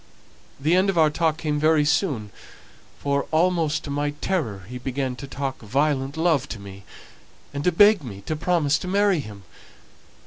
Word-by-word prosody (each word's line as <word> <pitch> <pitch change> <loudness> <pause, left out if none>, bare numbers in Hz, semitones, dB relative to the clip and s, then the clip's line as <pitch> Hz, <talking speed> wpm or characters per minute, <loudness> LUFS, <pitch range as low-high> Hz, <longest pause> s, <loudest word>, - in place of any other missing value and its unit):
The 155 +5 +2
end 190 +2 +3
of 190 - -1
our 155 -2 +5
talk 160 0 0
came 150 -2 -1
very 155 -1 +3
soon; 140 - 0 0.7
for, 140 0 -1
almost 160 -2 +1
to 145 - -6
my 145 +1 -1
terror, 120 - -2
he 125 +2 -7
began 130 0 -3
to 140 - -8
talk 135 0 -4
violent 135 +4 -1
love 160 -4 +1
to 110 - -6
me, 100 -1 -11 0.7
and 140 0 -3
to 180 - +3
beg 205 +2 +6
me 100 -6 -8
to 155 - -3
promise 155 -3 +1
to 185 - -6
marry 200 -1 +2
him. 105 -7 -9
150 Hz, 175 wpm, -24 LUFS, 130-165 Hz, 0.7 s, beg